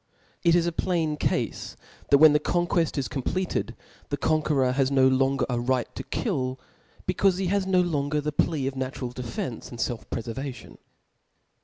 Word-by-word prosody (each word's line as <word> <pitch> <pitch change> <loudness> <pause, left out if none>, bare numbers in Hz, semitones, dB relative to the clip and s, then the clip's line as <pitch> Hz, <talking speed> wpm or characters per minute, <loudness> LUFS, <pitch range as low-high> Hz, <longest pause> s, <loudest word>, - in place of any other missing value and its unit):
It 170 -1 +4
is 170 -1 +3
a 170 - 0
plain 165 -3 0
cafe - - 0 0.6
that 140 - +7
when 155 +1 +8
the 150 - +4
conqueft 170 0 0
is 135 -4 0
completed, 145 - -2 0.3
the - - -1
conqueror 150 -4 +2
has 135 0 +1
no 135 -1 +4
longer 135 0 +2
a 120 -2 -1
right 125 0 -1
to - - -5
kill, 130 0 -2 0.5
be 185 - 0
caule 190 0 +3
he 190 - -1
has 190 +1 0
no 185 -1 +4
longer 150 -4 0
the 150 +1 -2
plea 150 -1 0
of 135 0 -2
natural 130 -1 -4
defence 125 -1 -5
and 120 - -9
felf 120 -1 -3
prefervation. 125 +3 -6
140 Hz, 175 wpm, -26 LUFS, 130-165 Hz, 0.6 s, when